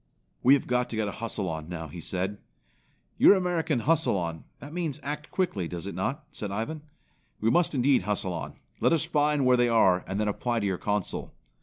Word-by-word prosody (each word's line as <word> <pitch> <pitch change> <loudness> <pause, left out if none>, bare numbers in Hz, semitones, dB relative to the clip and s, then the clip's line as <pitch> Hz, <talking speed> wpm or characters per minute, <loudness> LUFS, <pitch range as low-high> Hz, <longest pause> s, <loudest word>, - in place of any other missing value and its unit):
"We 135 +3 +7
have 140 - -2
got 125 0 0
to - - -4
get 110 -1 0
a - - -2
hustle 105 -4 -2
on 80 -1 -5
now," 80 -2 -5
he 85 +3 -9
said. 95 +4 -3 0.8
"Your - - +8
American 165 -7 0
hustle 150 -7 +2
on; 85 -2 -4
that 145 +2 -10
means 165 -6 -2
act 150 +2 -5
quickly, 110 - -1
does 85 +1 -6
it 100 - -5
not?" 130 - -2
said 105 - -5
Ivan. 115 +10 -3 0.6
"We 110 +2 +2
must 170 +2 +2
indeed 130 -1 +4
hustle 95 -1 -1
on. 85 - -5 0.2
Let - - +3
us 160 -1 +2
find 150 -3 +2
where 125 0 +5
they 120 0 +3
are, 95 -6 +4
and 95 +2 -2
then 105 - +1
apply 120 +3 -1
to - - -1
your 95 -2 -1
Consul." 105 -2 -2
115 Hz, 210 wpm, -28 LUFS, 95-145 Hz, 0.8 s, Your